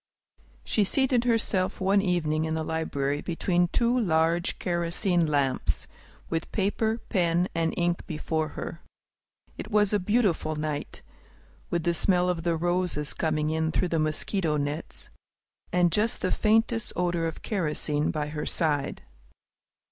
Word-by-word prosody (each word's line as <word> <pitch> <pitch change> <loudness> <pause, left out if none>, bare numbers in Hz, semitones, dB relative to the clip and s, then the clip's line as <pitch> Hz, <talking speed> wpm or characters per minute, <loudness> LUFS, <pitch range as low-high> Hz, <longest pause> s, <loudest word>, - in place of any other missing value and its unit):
She 215 - +1
seated 250 +3 +2
herself 220 -6 +1
one 195 +1 +3
evening 160 -5 0
in 160 0 -1
the 160 - -1
library, 145 -3 -1
between 175 0 +1
two 235 +6 +1
large 170 -3 +1
kerosene 175 0 0
lamps, 140 -3 +1 0.4
with 165 -1 -3
paper, 220 +2 0
pen, 175 -3 +2
and 165 -1 +1
ink 175 0 0
before 155 0 -2
her. 170 - -5 0.8
It - - -6
was 210 -1 +3
a 205 - +3
beautiful 195 -6 +1
night, 150 -1 -4 0.7
with 170 -1 -1
the 170 - +2
smell 180 +1 +2
of 175 -2 -1
the 170 -1 0
roses 175 -5 0
coming 155 0 0
in 160 0 0
through 180 +2 0
the 165 - 0
mosquito 155 +1 0
nets, 145 +2 -4 0.6
and 175 -1 +3
just 215 +6 +1
the 185 - 0
faintest 225 +1 +2
odor 175 -2 0
of 160 - -7
kerosene 150 -6 -1
by 150 -1 -2
her 150 0 -4
side. 145 -4 0
170 Hz, 140 wpm, -27 LUFS, 155-190 Hz, 0.8 s, one